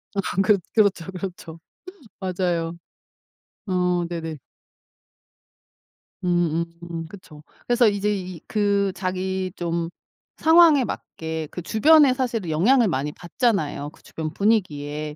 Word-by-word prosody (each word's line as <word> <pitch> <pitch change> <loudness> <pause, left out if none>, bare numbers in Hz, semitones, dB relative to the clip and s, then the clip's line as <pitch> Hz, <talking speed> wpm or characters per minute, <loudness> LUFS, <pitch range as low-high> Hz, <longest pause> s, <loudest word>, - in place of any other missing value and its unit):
아 - - -1 0.2
그렇 200 +1 +4 0.2
그렇죠, 205 -6 +3
그렇죠. 180 -3 -7 0.6
맞아요. 175 -3 -2 0.9
어 180 -2 +1
네네. 165 -2 -5 1.9
음음 170 -1 -1
그쵸. 160 -5 -13 0.2
그래서 240 -1 +4
이제 205 0 +1
이 185 -4 -6
그 200 -2 +1
자기 185 0 -2
좀 170 -1 -2 0.5
상황에 320 -4 +6
맞게 160 -8 -5
그 180 - -6
주변의 285 - +5
사실은 230 -9 -2
영향을 225 +10 +4
많이 150 -3 -1
받잖아요 175 - -1
그 - - -21
주변 155 -1 -6
분위기에. 150 -8 -1
180 Hz, 225 characters per minute, -23 LUFS, 165-205 Hz, 1.9 s, 상황에